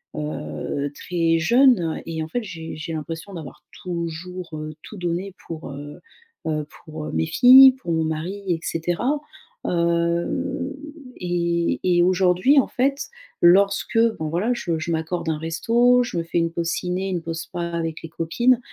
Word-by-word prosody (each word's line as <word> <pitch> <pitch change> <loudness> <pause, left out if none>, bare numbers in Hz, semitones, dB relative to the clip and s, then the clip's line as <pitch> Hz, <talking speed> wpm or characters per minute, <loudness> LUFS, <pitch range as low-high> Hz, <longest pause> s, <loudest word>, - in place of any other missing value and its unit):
heu, 140 - -4
très 165 -2 0
jeune 230 -4 +4
et 160 -1 -3
en - - -6
fait, 245 +7 -3
j'ai 165 -5 -7
j'ai 155 +1 -6
l'impression 165 +5 -6
d'avoir 155 -5 -9 0.2
toujours, 175 +1 -5
heu, 155 0 -6
tout 215 - -10
donné 180 +2 -3
pour, 160 -3 -6
heu 145 +1 -9 0.5
heu, 150 -2 -2 0.2
pour 155 -1 -7
mes 80 0 +1
filles, 260 - +9
pour 170 - -4
mon 160 0 +1
mari 165 +6 -3
et 170 -2 +1
cetera, 175 - -1 0.5
heu, 170 +10 0 0.4
et 170 -1 0
et 175 -1 +4
aujourd'hui 185 +9 +4
en - - +2
fait 275 +3 -1 0.3
lorsque 200 +5 +4 0.2
bon 155 - -2
voilà 190 +9 0
je 170 -8 -2
je 170 +2 -3
m'accorde 165 +1 -2
un 155 - 0
resto, 235 +10 +3
je 235 - -5
me 165 - 0
fais 165 - -3
une 165 0 +1
pause 170 0 -2
ciné, 185 +2 -2
une 175 -3 -2
pause 165 0 -4
spa 175 -2 -6
avec 165 -1 -3
les 165 - -7
copines, 235 +11 +2
170 Hz, 165 wpm, -23 LUFS, 160-190 Hz, 0.5 s, filles